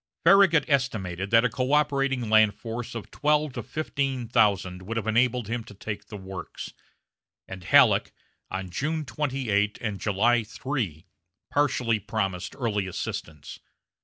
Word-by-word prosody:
Farragut 190 -6 +6
estimated 100 - -1
that 115 +2 +5
a - - +3
coöperating 135 0 +1
land 110 -1 +5
force 120 +1 -6
of 115 - -7
twelve 150 -1 +1
to 120 - -4
fifteen 135 -2 -3
thousand 100 -5 +2
would 110 +5 -5
have 115 - -2
enabled 120 +1 +2
him 115 +1 -3
to 105 - -13
take 105 +1 -6
the 105 - -8
works; 95 -1 -8 0.7
and 95 -1 -8
Halleck, - - +5 0.4
on 95 -1 -5
June 155 - -2
28 130 -7 -1
and 105 -4 -3
July 115 +4 +2
3, 110 - -4 0.5
partially 125 -6 +1
promised 95 -3 -3
early 105 -7 -1
assistance. 80 -4 -6
115 Hz, 135 wpm, -26 LUFS, 100-135 Hz, 0.7 s, Farragut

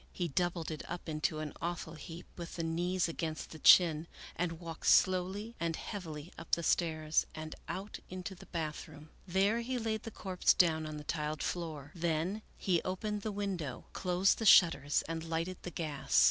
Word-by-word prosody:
He 175 -2 -2
doubled 175 +1 -1
it 155 - -4
up 175 0 -5
into 155 0 -1
an 155 -1 -5
awful 170 -2 -3
heap, 165 +2 -9
with 170 -1 -7
the 165 - -2
knees 175 +3 0
against 160 -1 -4
the 160 - -9
chin, 165 -2 +7 0.3
and 175 -1 -1
walked 165 -2 -6
slowly 190 +4 +3
and 165 -1 0
heavily 165 -6 -6
up 165 - -10
the 170 - +3
stairs 155 -2 +2
and 155 0 -6
out 195 +3 -5
into 185 +1 -5
the 180 - -13
bathroom. 155 -2 -5 0.2
There 195 +5 +3
he 255 +2 -2
laid 220 -2 -1
the - - -6
corpse 190 -4 +2
down 160 -3 +3
on 155 0 -5
the 150 - -7
tiled 150 0 -2
floor. 155 -5 -4
Then 170 +4 -1 0.2
he 175 -4 +1
opened 205 +3 -2
the 215 - -2
window, 190 -9 -3
closed 180 +1 +2
the 225 - -2
shut 175 -3 +9
ters, 145 +1 0
and 165 0 -4
lighted 165 +3 -2
the - - -5
gas. 155 -4 0
170 Hz, 185 wpm, -33 LUFS, 160-185 Hz, 0.3 s, shut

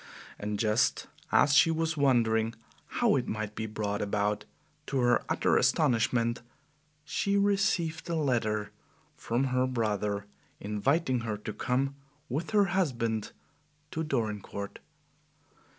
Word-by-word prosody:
And 105 0 -3
just 110 +2 +2 0.3
as 140 - +5
she 150 +3 +6
was 165 0 0
wondering 115 -5 +2 0.3
how - - +2
it - - -2
might 110 -1 -3
be 110 0 -4
brought 105 -1 -2
about, 105 0 0 0.4
to 135 - -1
her 120 -1 +3
utter - - +2
astonishment, 115 0 +2 0.6
she 200 +5 0
received 195 -5 +1
a 170 - 0
letter 115 -8 0 0.4
from 120 +3 -1
her 130 0 +2
brother 105 -4 -1 0.3
inviting 130 +7 +1
her 110 -2 -3
to 105 +1 -6
come 130 +5 0 0.4
with 150 +7 -2
her 205 -2 +4
husband 115 - 0 0.6
to 160 - -2
Dorincourt. 105 -7 -3
115 Hz, 120 wpm, -29 LUFS, 105-145 Hz, 0.6 s, she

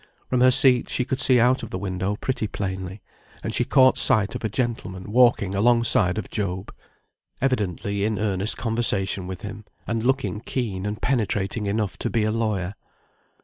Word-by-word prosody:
From 125 -1 +2
her 130 - +7
seat 125 -1 +5
she 125 - -1
could 130 0 -2
see 130 -2 +4
out 125 +3 +3
of 115 - -7
the - - -4
window 95 +1 -3
pretty 110 -1 -3
plainly, 95 -1 -5 0.4
and 110 - -3
she 120 - +2
caught 130 0 +4
sight 100 -3 +3
of - - -6
a 110 - -1
gentleman 105 -5 -4
walking 115 -5 +3
alongside 110 -3 +3
of 110 - -5
Job, 95 -2 -4 0.7
evidently 100 -5 -1
in 105 0 0
earnest 105 0 0
conversation 100 -5 0
with 95 +2 -7
him, 105 +1 -7 0.2
and 115 -1 -2
looking 130 -4 0
keen 105 -6 -3
and 105 +1 -5
penetrating 105 -4 -1
enough 105 -1 -2
to - - -2
be 115 - 0
a 110 - 0
lawyer. 105 -5 -2
105 Hz, 175 wpm, -23 LUFS, 95-120 Hz, 0.7 s, her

